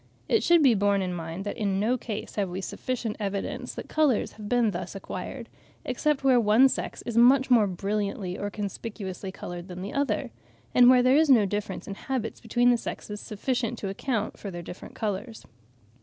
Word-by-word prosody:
It 450 - +3
should 340 -2 +5
be 260 -4 +6
borne 200 -1 +2
in 180 -1 -2
mind 165 +3 -5
that 205 - -4
in 195 -2 0
no 225 +5 +2
case 225 -3 -5
have 200 -3 -1
we 180 +2 -4
sufficient 230 +2 -4
evidence 215 +6 -3
that - - -7
colours 300 -7 +2
have 210 -1 -9
been 240 -3 +3
thus 180 +1 -5
acquired, 195 +5 -6 0.4
except 275 +3 0
where 260 -2 +5
one 230 +4 +5
sex - - -4
is 235 -1 -4
much 260 +2 +5
more 225 -4 +6
brilliantly 200 0 -2
or 205 - -3
conspicuously 200 -2 -5
coloured 175 -1 -7
than 180 0 -7
the 200 - -6
other, 280 0 -1 0.4
and 245 0 +7
where 250 -1 +6
there 255 +3 +5
is 315 -1 +4
no 235 -6 +6
difference 205 +2 -4
in 200 - -4
habits 230 +1 -4
between 240 +2 +3
the 240 - +3
sexes 210 -2 -6
sufficient 240 +2 -2
to 200 - -4
account 215 +2 -2
for 200 - -6
their 175 -2 -7
different 175 - -10
colours. 220 +1 -4
215 Hz, 195 wpm, -27 LUFS, 195-250 Hz, 0.4 s, and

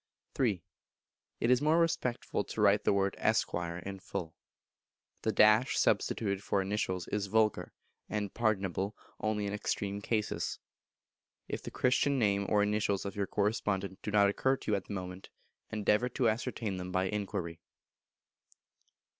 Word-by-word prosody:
iii. 105 -10 +1 0.8
It 115 - +2
is 125 +1 +4
more 155 +2 +4
respectful 125 -10 0
to - - -7
write 105 0 +4
the - - +4
word 100 -1 +2
"Esquire" 85 -6 0
in 95 +2 -6
full. 80 -3 -5 0.9
The 110 +1 +5
substituted 100 -3 +1
for 100 - +1
initials 95 -3 -1
is 105 -1 -1
vulgar, 110 +1 +1 0.4
and 105 -2 -2
pardonable 100 -3 0 0.2
only 105 -1 -1
in 100 - -2
extreme 100 -1 -2
cases; 105 0 -1 0.9
if - - -4
the - - -6
Christian 135 +2 +2
name 100 -4 +2
or 105 -1 +4
initials 105 -1 0
of 100 - -4
your 100 -1 -1
correspondent 100 -2 -1
do - - -4
not 105 -1 +5
occur 130 +7 +1
to - - -4
you - - +4
at 100 - -3
the - - -6
moment, 90 0 -6 0.4
endeavour 105 +3 +1
to 120 -1 +2
ascertain 110 -3 -2
them 90 0 -5
by 95 0 +1
inquiry. 95 -4 -3
105 Hz, 145 wpm, -32 LUFS, 95-110 Hz, 0.9 s, The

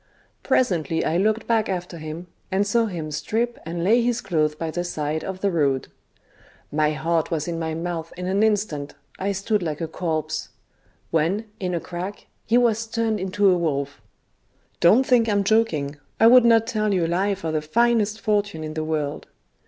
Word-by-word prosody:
Presently 165 - +1
I 160 - +1
looked 215 +4 +1
back 225 -3 +1
after 180 -2 -4
him, 155 +3 -6 0.3
and 195 +2 +2
saw 230 +3 +2
him 165 -6 -5
strip 225 +11 -2
and 170 +1 -3
lay 225 +6 +4
his 240 0 0
clothes 155 -7 0
by 160 +1 -4
the 175 +2 -2
side 155 -2 -3
of 190 -1 -5
the 200 - +1
road. 140 -6 0 0.8
My 150 0 +2
heart 165 +2 0
was 160 -2 -2
in 170 -1 -3
my 160 -1 -2
mouth 165 -1 -4
in 180 - -4
an 195 +2 +1
instant, 205 -10 0 0.2
I 195 +2 0
stood 200 +2 0
like 155 -4 -3
a 165 - -2
corpse; 155 -2 -3 0.6
when, 170 +7 +1
in 180 -2 -2
a - - 0
crack, 180 +4 -6 0.2
he 230 - +4
was 230 -2 +2
turned 225 -1 -1
into 195 +2 +1
a - - +4
wolf. 140 -4 -2 0.8
Don't 220 +10 +5
think 235 -3 +3
I'm 205 -1 +2
joking: 170 -10 +1 0.2
I 225 - +6
would 245 +1 +8
not 225 -1 +5
tell 215 -3 0
you 175 -3 +1
a - - 0
lie 195 +4 +1
for 165 -4 -4
the 155 -1 0
finest 220 +5 +2
fortune 205 -6 0
in 155 0 -5
the 155 0 -2
world. 155 -2 -3
180 Hz, 190 wpm, -23 LUFS, 160-215 Hz, 0.8 s, would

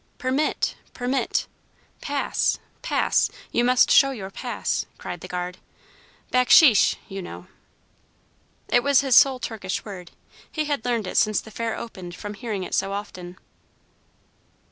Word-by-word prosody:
"Permit! 265 +3 0 0.2
Permit! 255 +2 -1 0.6
Pass! 285 -1 0 0.2
Pass! - - +1 0.2
You 240 - +2
must 250 0 +4
show 275 - +7
your 200 -8 -6
pass!" - - -3
cried - - -7
the - - -8
guard. 180 0 -5 0.7
"Backsheesh, 250 - +6
you 195 0 -6
know." 90 - -9 1.2
It 245 - +3
was 280 +1 +4
his 270 -2 0
sole 270 -2 +7
Turkish 220 -6 -4
word. 185 -5 -8 0.4
He 310 -1 -2
had 290 -6 -2
learned 235 -4 0
it - - -4
since 215 -1 +3
the 220 - -11
Fair 230 +1 -3
opened 180 -6 -8
from 205 +3 -7
hearing 205 -2 -4
it - - -7
so 195 - 0
often. 185 -3 -7
225 Hz, 140 wpm, -24 LUFS, 190-255 Hz, 1.2 s, show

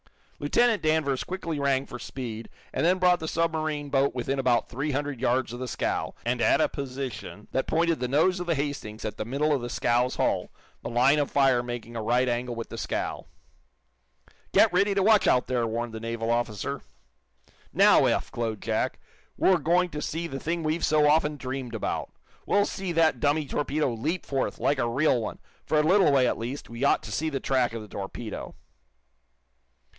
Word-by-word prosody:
Lieutenant 225 +9 +2
Danvers 155 -4 +1
quickly 170 -5 -4
rang 140 -1 +1
for - - -8
speed 115 -4 -6 0.2
and - - -1
then 180 +3 +4
brought 180 -1 +4
the 160 - -5
submarine 155 -3 -1
boat 135 -1 +2
within 135 +2 -2
about 125 -3 +2
three 135 +5 -3
hundred 145 -2 -2
yards 125 -2 +1
of 120 - -6
the 130 - -4
scow, - - -2
and - - 0
at - - +4
a - - +4
position 130 -6 -6
that 130 - -1
pointed 165 0 +1
the 125 - -1
nose 160 +8 +2
of 180 - -5
the 165 - +2
"Hastings" 140 -7 -4
at 105 -1 -4
the 110 - -3
middle 145 +6 +1
of 140 - 0
the 120 - -5
scow's 120 +1 +1
hull, - - 0 0.3
the - - -5
line 130 +5 +4
of 145 - 0
fire 135 -3 +3
making 120 -1 -6
a 115 - -2
right 120 +3 +2
angle 120 0 -1
with 115 0 -6
the - - -6
scow. - - -3 1.2
"Get - - +5
ready 200 +2 +3
to 195 - +2
watch, 215 0 +5
out 125 - +4
there!" 120 -2 0
warned 115 +1 -3
the 110 - -5
naval 115 0 -2
officer. 120 -4 -2 0.9
"Now, - - +6
Eph," - - 0
glowed 115 -3 -3
Jack, - - -1 0.4
"we're 185 -2 +4
going 175 +4 +2
to 150 - -4
see 165 +3 -3
the 135 -5 -5
thing 165 +2 -2
we've 155 +2 -1
so 150 -1 +4
often 150 0 +3
dreamed 130 -2 -5
about! - - -3 0.4
We'll 205 0 +3
see 190 -2 -4
that 165 -1 +3
dummy 150 +1 +1
torpedo 145 -1 -1
leap 155 +11 -2
forth, 135 -2 -2
like 140 -1 +1
a 120 - +1
real 130 0 +2
one. - - -5 0.3
For 155 - 0
a 150 - +4
little 185 0 +5
way, 135 -2 +4
at - - 0
least, 125 +5 -5
we 115 +3 -6
ought 140 - +3
to - - -8
see 160 +1 -1
the 140 -3 -2
track 130 -3 +1
of 115 -2 -5
the - - -11
torpedo." 100 +3 -6
135 Hz, 200 wpm, -27 LUFS, 120-155 Hz, 1.2 s, Now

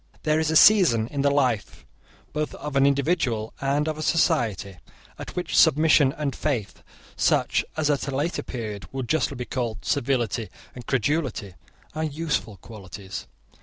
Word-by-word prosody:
There 155 0 +2
is 160 -1 0
a 160 - 0
season 160 - +6
in 140 - -2
the 140 - +3
life 130 -7 -1 0.5
both 150 0 -3
of 150 -1 -7
an 135 0 +5
individual 135 -6 0
and 140 +2 0
of 155 -1 -3
a - - -3
society, 115 - 0 0.4
at - - -8
which 180 - -3
submission 155 -3 +5
and 145 -3 -2
faith, 120 -9 -3 0.3
such - - +2
as 155 -2 +1
at 145 0 -1
a 140 - -3
later 150 +6 -1
period 105 -6 -6
would 130 -2 -4
be - - -3
justly 140 -5 -1
called 120 -4 -4
servility 120 -6 -1 0.2
and 125 -1 -11
credulity, 135 - -1 0.4
are 155 +1 -3
useful 150 -8 -2
qualities. 100 -2 -9
140 Hz, 160 wpm, -24 LUFS, 115-155 Hz, 0.5 s, season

